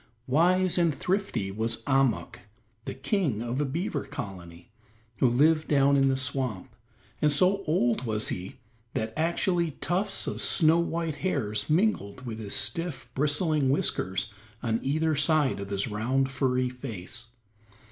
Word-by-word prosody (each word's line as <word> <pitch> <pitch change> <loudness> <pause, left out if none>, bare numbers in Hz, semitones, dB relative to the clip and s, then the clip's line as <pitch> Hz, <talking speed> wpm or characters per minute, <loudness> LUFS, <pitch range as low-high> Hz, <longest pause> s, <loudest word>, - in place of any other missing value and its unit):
Wise 180 +7 +3
and 165 -4 +2
thrifty 185 - -1
was 110 +2 -2
Ahmuk, 135 -11 +1 0.5
the - - -5
King 135 - -1
of 120 +4 -2
a - - +1
Beaver 150 +1 -2
Colony 90 +1 -8 0.5
who 130 - +4
lived 155 +6 +3
down 140 -1 +4
in 135 -1 +4
the 135 0 +2
swamp, 130 -7 -2 0.5
and 150 - +4
so 185 +7 +3
old 120 -7 +1
was 110 -2 -1
he 90 +1 -5 0.4
that 110 0 -2
actually 170 +1 +1
tufts 190 +4 -1
of - - -3
snow 160 -1 +4
white 165 -2 -2
hairs 110 - -2
mingled 150 - 0
with 115 -2 -5
his 105 -2 -3
stiff, 135 +2 -2
bristling 150 0 +2
whiskers 105 -6 0 0.3
on 115 -1 0
either 155 +3 +1
side 150 -4 +2
of 100 0 -6
his 100 +3 -1
round, 130 +5 0
furry 130 -1 +1
face. 120 -2 -7
135 Hz, 145 wpm, -27 LUFS, 115-160 Hz, 0.5 s, who